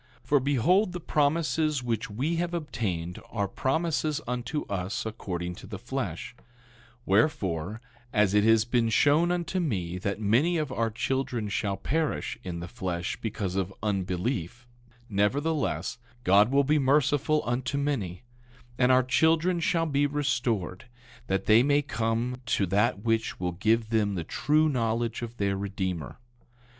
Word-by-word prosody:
10:2 - - -25
For 145 - +4
behold, 145 - +2
the 180 - -4
promises 155 -2 +1
which 115 -3 -2
we 140 +11 -1
have 175 0 -1
obtained 95 - -3
are 100 -4 -1
promises 155 - 0
unto 125 +4 -2
us 100 +3 -3
according 90 -5 -4
to 95 - -11
the 100 -1 -6
flesh; 120 -5 -4 0.7
wherefore, 95 - +1 0.3
as 105 -3 +3
it 105 0 +4
has 115 0 +4
been 120 -1 +1
shown 145 +9 +4
unto 180 +1 -1
me 90 - -2
that 100 +2 -2
many 125 +12 +2
of 150 -4 -2
our 115 -2 0
children 120 -1 -2
shall 100 -1 -1
perish 155 +9 -1
in 85 -2 -5
the 85 - -5
flesh 90 -5 -3
because 100 -4 -3
of 95 -1 -1
unbelief, 100 +2 -2 0.4
nevertheless, 140 +10 0 0.2
God 100 +2 +5
will 140 +1 +4
be 150 +2 +2
merciful 145 +2 +2
unto 125 +4 -1
many; 125 -11 -2 0.6
and 125 0 +4
our 130 0 +5
children 160 +7 +2
shall 165 +1 +1
be 145 -2 +2
restored, 120 -10 -1 0.4
that 95 0 -1
they 110 +2 +6
may 145 +2 +3
come 115 -1 -1
to 100 - +2
that 100 +3 +1
which 115 -1 0
will 90 -1 -1
give 110 +5 +1
them 105 -3 +1
the 85 - -2
true 150 - +2
knowledge 115 -4 -1
of 120 0 -6
their 100 -1 0
Redeemer. 95 -5 -4
115 Hz, 150 wpm, -28 LUFS, 100-145 Hz, 0.7 s, they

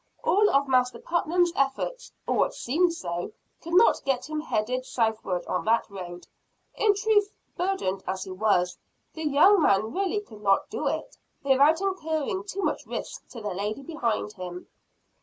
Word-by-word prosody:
All 415 +2 +4
of 280 0 +2
Master 255 -1 +2
Putnam's 345 +1 +1
efforts 275 - -1
or - - 0
what - - +1
seemed 335 +8 +1
so 180 - -4 0.3
could 335 +1 -3
not 430 +6 +5
get 270 -1 -1
him 310 0 -3
headed 255 -1 -1
southward 220 -7 -1
on - - -2
that 225 +1 +2
road. 180 -2 -8 0.5
In 420 -2 +3
truth, 415 0 +2 0.3
burdened 350 - -1
as 190 0 -2
he 190 - -8
was, 185 -2 +1 0.3
the 320 -1 -3
young 330 +7 +6
man 210 -3 +2
really 390 +3 0
could 215 - -14
not 195 -1 +2
do - - -2
it, - - -3 0.3
without 280 +5 +4
incurring 370 -2 -1
too 395 -1 -4
much - - -1
risk - - -6
to 235 - -10
the 210 -3 -3
lady 210 +8 -3
behind 235 -9 -2
him. 180 -2 -8
275 Hz, 165 wpm, -26 LUFS, -, 0.5 s, young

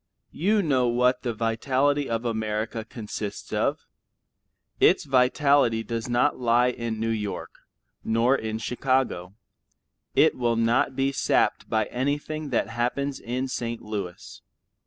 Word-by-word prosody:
You 205 +5 +1
know 130 -6 +2
what 125 +1 +2
the 120 - -2
vitality 130 +6 0
of 115 +1 -2
America 110 0 -2
consists 105 -2 -6
of. - - 0 0.9
Its - - +5
vitality 130 -2 +3
does 115 +1 -4
not 125 +4 +2
lie 120 0 +3
in 115 -2 -4
New 115 +1 0
York, 105 -3 -4 0.5
nor 115 +4 +3
in 110 -3 -3
Chicago; 125 -6 -1 0.8
it - - +5
will 120 -2 +1
not 120 +4 +2
be 135 +1 +1
sapped 135 - +1
by 110 -1 +1
anything 145 +5 -3
that 125 - 0
happens 125 +4 -2
in 125 +3 -3
St. 115 -2 -3
Louis. 100 -5 -6
120 Hz, 130 wpm, -25 LUFS, 115-135 Hz, 0.9 s, Its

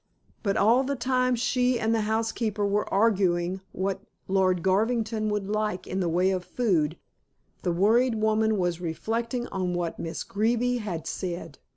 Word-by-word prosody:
But 200 +1 0
all 230 +6 +4
the 280 +1 -1
time 255 0 +1
she 250 +1 +1
and 225 +1 +1
the 225 - +2
housekeeper 220 -1 0
were 205 +1 0
arguing 190 -3 +2
what 195 0 -2 0.3
Lord 185 -2 +2
Garvington 220 +2 +1
would 210 -2 -2
like 210 -2 -1
in 190 - -3
the 175 -3 0
way 180 +3 +2
of 185 -1 -1
food, 175 -6 0 0.6
the 180 - 0
worried 225 +7 +3
woman 220 0 +2
was 175 -2 -1
reflecting 230 +9 -2
on 180 -2 -2
what 175 -2 -3
Miss 165 0 -4
Greeby 235 +4 +1
had 190 -8 -4
said. 170 -5 -5
205 Hz, 160 wpm, -27 LUFS, 180-230 Hz, 0.6 s, all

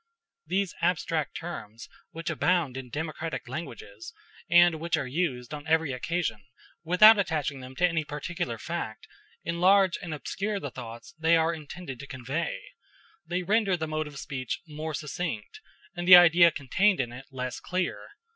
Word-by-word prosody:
These 190 -1 0
abstract 165 -3 0
terms 115 -10 -8 0.2
which 165 +1 -4
abound 170 -8 +1
in 130 -1 -7
democratic 155 0 -4
languages, 340 - -8 0.3
and 175 -1 +6
which 170 +1 0
are 140 - -2
used 130 -3 -2
on 145 +1 -7
every 160 -2 +2
occasion 125 - -2 0.4
without 205 +6 +7
attaching 150 -7 -1
them 130 0 -10
to 180 - +3
any 165 -2 -1
particular 150 -3 -4
fact, 160 -7 -5 0.4
enlarge 185 +2 +3
and 175 - -6
obscure 200 +7 -3
the 145 -7 -6
thoughts 115 -2 -9
they 165 +1 +4
are 165 +1 +2
intended 155 -3 -8
to 140 - -9
convey; 135 +6 -3 0.7
they 180 +2 -2
render 200 -1 +2
the 160 -1 -3
mode 155 0 -2
of 145 -2 -10
speech 130 -3 -4
more 155 0 -5
succinct, 150 -7 -5 0.3
and 175 0 -4
the 185 - +12
idea 175 -1 +8
contained 185 +7 +1
in 120 -3 -1
it 125 +2 -10
less 125 -2 -5
clear. 180 0 -3
160 Hz, 155 wpm, -28 LUFS, 135-175 Hz, 0.7 s, the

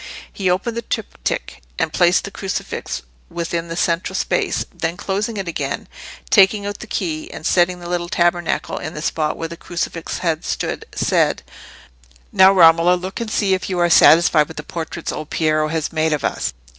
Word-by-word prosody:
He 190 -2 -1
opened 190 +6 0
the 235 - -2
triptych 220 - -4 0.2
and - - -1
placed 175 +1 +3
the 200 - -6
crucifix 190 - -4 0.3
within 170 0 -3
the 165 - -5
central 170 0 0
space; - - 0
then 165 +1 -3
closing 205 +3 -2
it 195 -2 -4
again, 145 -4 -3 0.4
taking 200 +1 +5
out 205 0 -4
the - - -9
key, 160 -5 -3
and - - -9
setting 180 +1 +2
the 175 - -8
little 175 0 -2
tabernacle 175 -1 0
in 155 - -6
the 150 - -5
spot 155 -2 -1
where 165 - -3
the 170 +1 -9
crucifix 170 -1 -4
had 165 -3 -1
stood, - - -3
said— - - +1 0.9
"Now, 190 +1 +7
Romola, 170 -1 +6
look 185 +5 -5
and 230 - -3
see 200 -3 +1
if 185 - -2
you 185 - -2
are 175 -1 +2
satisfied 160 -2 +6
with - - -11
the 150 - -5
portraits 165 +1 -5
old 155 0 -6
Piero 155 -1 +1
has 160 0 -2
made 160 0 +1
of 150 - -2
us. - - -1
175 Hz, 185 wpm, -20 LUFS, 160-185 Hz, 0.9 s, Now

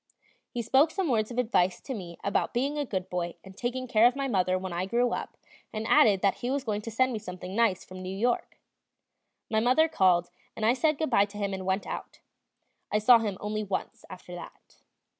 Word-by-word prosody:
He 240 - -4
spoke 265 +7 +4
some 365 0 -2
words 220 -4 +1
of 240 - -7
advice 205 -7 +2
to 270 - -5
me 175 -7 -7
about 200 - 0
being 275 +4 0
a 295 -1 -1
good 190 -4 -3
boy 175 -1 -3
and 190 -1 -13
taking 255 +3 -3
care 230 -1 +5
of 245 - 0
my 275 0 -1
mother 185 -5 +1
when 185 -1 -5
I 180 +2 -2
grew 240 +3 +1
up, - - -4 0.3
and 215 0 -4
added 200 -3 +5
that 200 -2 +2
he 245 - -3
was 275 0 -1
going 210 -3 -2
to 230 - -6
send 255 +3 +1
me 220 - -3
something 185 -1 -7
nice 225 -5 +2
from 185 0 -10
New 185 +1 -5
York. 240 +3 -1 0.9
My 220 - +3
mother 255 +8 +4
called, 180 - +2 0.2
and 215 - -2
I 230 - +5
said 305 +3 +1
good 315 -3 -2
bye 200 -3 +5
to 205 0 -12
him 200 -1 -2
and 190 -1 -5
went 190 +1 0
out. - - -7 0.7
I 210 - +3
saw 230 +3 +7
him 210 -4 -3
only 215 +1 -3
once 195 -2 -4
after 180 -1 -10
that. 175 - -11
215 Hz, 225 wpm, -28 LUFS, 190-245 Hz, 0.9 s, saw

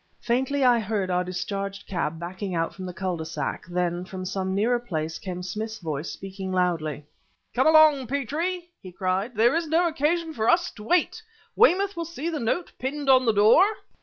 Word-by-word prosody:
Faintly, 265 +4 0
I 245 -2 +5
heard 205 -3 -2
our 180 0 +1
discharged 195 +2 -4
cab 165 -3 -3
backing 185 +2 -5
out 165 0 -1
from 185 -1 -7
the - - -4
cul 185 -2 -2
de 160 - -4
sac; 160 +1 -4
then, 175 0 -1
from 185 0 -7
some 190 0 -2
nearer 235 +4 +2
place, 165 -8 -4
came 180 -3 -6
Smith's 215 +4 -4
voice 155 -5 -4
speaking 190 0 -6
loudly. 165 -5 -1 0.5
"Come - - +3
along, 310 -4 +6
Petrie!" 330 +7 -2
he 185 - -10
cried; 190 +6 -2
"there 235 +6 +4
is 330 -1 0
no 335 +3 +3
occasion 325 +1 0
for 225 -4 0
us 345 +1 +3
to 210 - -12
wait. 355 - +1 0.3
Weymouth 400 -2 +4
will 335 0 -3
see 330 -1 -4
the 310 - -3
note 245 +10 -1
pinned 275 +1 0
on 260 -1 +5
the - - +6
door." 215 - +6
215 Hz, 190 wpm, -25 LUFS, 185-290 Hz, 0.5 s, along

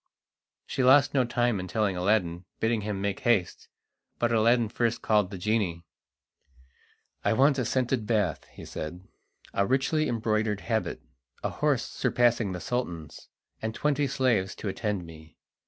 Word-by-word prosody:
She 130 - -1
lost 140 +2 +6
no 130 -3 +3
time 120 -3 +1
in 90 - -5
telling 100 0 0
Aladdin, 90 -2 0
bidding 115 -1 +1
him 105 -2 -3
make 100 0 -1
haste. 110 -7 0 0.5
But 120 0 +1
Aladdin 115 +1 +3
first 115 +1 -1
called 105 -4 +3
the 95 - -7
genie. 90 -4 -1 1.4
"I - - +2
want 135 +3 +4
a 125 - 0
scented 125 -2 0
bath," 105 -9 0
he - - -12
said, 90 +5 -7 0.5
"a 100 0 +1
richly 135 +4 +1
embroidered 110 -2 0
habit, 110 -2 -2 0.4
a - - -1
horse - - +1
surpassing 120 -4 +1
the 90 - -4
Sultan's, 85 - -4 0.3
and 110 0 -3
twenty 145 -1 +1
slaves 120 -7 +1
to 105 - -4
attend 100 -2 -2
me. 80 -1 -14
110 Hz, 150 wpm, -28 LUFS, 95-120 Hz, 1.4 s, lost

